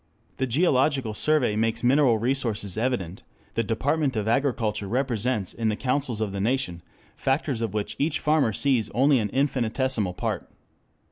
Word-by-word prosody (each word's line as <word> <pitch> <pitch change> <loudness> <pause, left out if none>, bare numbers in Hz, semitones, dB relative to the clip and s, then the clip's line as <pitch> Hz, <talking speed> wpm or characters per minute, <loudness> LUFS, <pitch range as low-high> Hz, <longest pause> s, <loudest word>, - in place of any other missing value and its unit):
The 130 - 0
Geological 135 -3 +2
Survey 130 -2 +2
makes 115 +1 0
mineral 130 -2 +4
resources 115 -5 -1
evident, 110 -5 -2 0.3
the 115 - +1
Department 135 +6 0
of 110 -1 -1
Agriculture 115 -5 0
represents 120 -3 -1
in 115 -1 -1
the 105 - 0
councils 130 -2 -1
of 105 -2 -1
the 100 0 -3
nation 110 -7 -1 0.3
factors 135 -3 -1
of 110 -3 -3
which 105 -1 -2
each 150 +1 0
farmer 150 -6 +2
sees 115 -1 +1
only 135 +2 +4
an 105 -2 -1
infinitesimal 130 -5 0
part. - - -3
120 Hz, 150 wpm, -25 LUFS, 110-135 Hz, 0.3 s, mineral